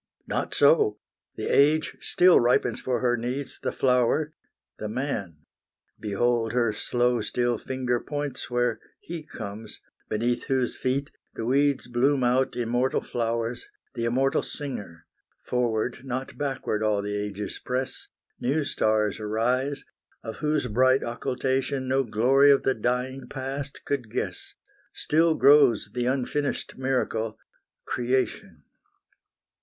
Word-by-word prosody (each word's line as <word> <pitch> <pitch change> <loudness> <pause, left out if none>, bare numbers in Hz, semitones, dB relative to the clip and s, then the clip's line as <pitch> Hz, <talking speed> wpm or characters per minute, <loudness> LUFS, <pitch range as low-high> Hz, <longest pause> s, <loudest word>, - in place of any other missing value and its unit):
Not - - -2
so! 430 -4 +4 0.4
The - - -4
age 150 +3 +3
still 180 -1 +5
ripens 120 +1 +2
for 125 -1 -1
her 120 -1 +3
needs 125 +4 -4
The - - -1
flower, 130 +4 +2 0.5
the 105 - -4
man. 105 - -3 0.6
Behold 115 +2 0
her 120 -3 +2
slow 120 +2 +1
still 120 +1 0
finger 125 -2 -1
Points 145 -1 -4
where 120 -2 0 0.2
He 170 -1 -6
comes, 105 -6 -8 0.3
beneath 120 +2 0
whose 130 -2 0
feet 135 +2 -1 0.2
the 115 - -4
weeds 140 +1 +2
Bloom 130 +3 +2
out 125 +2 +2
immortal 120 +2 0
flowers, 115 0 -2 0.3
the 115 -3 -2
immortal 130 +3 +2
Singer! 105 - -7 0.4
Forward, 120 0 0
not 130 0 -4
backward 135 -7 -2
all 105 -2 +1
the 105 0 -3
ages 105 0 -4
press; 130 +1 -3 0.3
New 145 +5 +1
stars 110 -5 +1
arise, 125 +6 -1 0.4
of 110 - -6
whose 150 -1 0
bright 130 +4 +3
occultation 130 +2 -1
No 135 +1 +2
glory 130 +5 +4
of 140 -1 +5
the 135 - +2
dying 125 +3 -2
past 135 +2 -6
could 130 -6 -2
guess: - - -4 0.4
Still 160 +1 +2
grows 135 -8 +5
the 125 0 -1
unfinished 140 +2 -1
miracle, 125 -4 -1 0.5
Creation. 125 +2 -1
125 Hz, 125 wpm, -26 LUFS, 115-135 Hz, 0.6 s, still